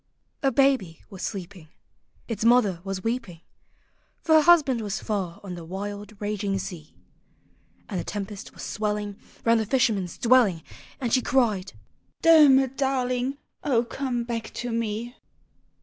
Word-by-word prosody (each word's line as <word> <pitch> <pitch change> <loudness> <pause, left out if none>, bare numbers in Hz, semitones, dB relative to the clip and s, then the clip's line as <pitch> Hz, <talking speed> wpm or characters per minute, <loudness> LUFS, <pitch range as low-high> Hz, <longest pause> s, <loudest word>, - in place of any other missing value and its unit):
"] - - -47
A 270 -2 +2
baby 260 - +2
was 190 -2 -9
sleeping; 180 -4 -6 0.6
Its 230 -2 -3
mother 225 -7 +4
was 195 -1 -4
weeping; 225 -8 -3 0.8
For 320 - +3
her 315 - +8
husband 295 -8 +5
was 210 -1 -3
far 195 -6 -3
on 190 -3 -6
the 175 -1 -7
wild 205 +4 -7
raging 205 -1 -2
sea; 170 -5 -7 0.9
And 190 -5 -3
the - - -3
tempest 205 -1 -6
was - - -11
swelling 210 -1 -2 0.3
Round 230 0 +4
the 220 - -1
fisherman's 220 -8 +1
dwelling; 230 -9 +4 0.4
And 245 -4 -2
she 255 - +4
cried, 215 -8 +1 0.3
" - - -44
Dermot. 270 -5 +6
darling! 260 -1 0 0.3
O 240 -4 +2
come 245 -1 -2
back 230 -2 -4
to 245 0 -3
me 230 +2 -3
220 Hz, 150 wpm, -25 LUFS, 195-255 Hz, 0.9 s, her